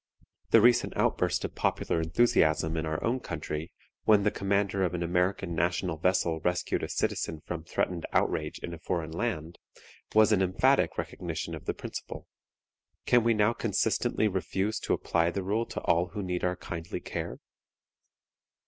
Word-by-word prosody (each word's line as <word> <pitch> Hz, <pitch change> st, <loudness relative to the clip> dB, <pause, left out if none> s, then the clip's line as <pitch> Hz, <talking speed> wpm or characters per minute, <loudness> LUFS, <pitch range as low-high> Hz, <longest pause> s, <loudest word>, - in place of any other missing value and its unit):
The 115 Hz, -, +7 dB
recent 120 Hz, +1 st, +4 dB
outburst -, -, +1 dB
of -, -, -5 dB
popular 80 Hz, -, 0 dB
enthusiasm 80 Hz, -3 st, +2 dB
in 80 Hz, 0 st, -2 dB
our 80 Hz, 0 st, -2 dB
own 125 Hz, +3 st, +1 dB
country 80 Hz, -8 st, -5 dB, 0.3 s
when 105 Hz, -2 st, +5 dB
the 105 Hz, -, +2 dB
commander 100 Hz, 0 st, 0 dB
of 90 Hz, -1 st, 0 dB
an 85 Hz, -, -2 dB
American 90 Hz, +1 st, 0 dB
national 85 Hz, 0 st, 0 dB
vessel 85 Hz, -2 st, +1 dB
rescued 90 Hz, +2 st, 0 dB
a -, -, -4 dB
citizen 80 Hz, -, -1 dB
from 85 Hz, -2 st, -5 dB
threatened 85 Hz, 0 st, -2 dB
outrage -, -, 0 dB
in 85 Hz, -, -4 dB
a 85 Hz, -, -8 dB
foreign 80 Hz, -1 st, -3 dB
land, 85 Hz, -3 st, -3 dB, 0.6 s
was 110 Hz, 0 st, +6 dB
an 100 Hz, -3 st, +4 dB
emphatic 95 Hz, -1 st, +2 dB
recognition 85 Hz, -1 st, -4 dB
of 80 Hz, -, -7 dB
the -, -, -2 dB
principle. -, -, -7 dB, 0.8 s
Can 120 Hz, -1 st, +4 dB
we 115 Hz, 0 st, +3 dB
now 105 Hz, +2 st, +3 dB
consistently 110 Hz, +1 st, +1 dB
refuse 95 Hz, +2 st, -1 dB
to -, -, -1 dB
apply 85 Hz, 0 st, +1 dB
the 95 Hz, +2 st, -3 dB
rule 110 Hz, +5 st, 0 dB
to -, -, -5 dB
all 85 Hz, +1 st, +2 dB
who 100 Hz, +3 st, -5 dB
need 90 Hz, -1 st, -2 dB
our 90 Hz, 0 st, +1 dB
kindly 85 Hz, -2 st, -6 dB
care? -, -, -5 dB
90 Hz, 165 wpm, -29 LUFS, 85-105 Hz, 0.8 s, The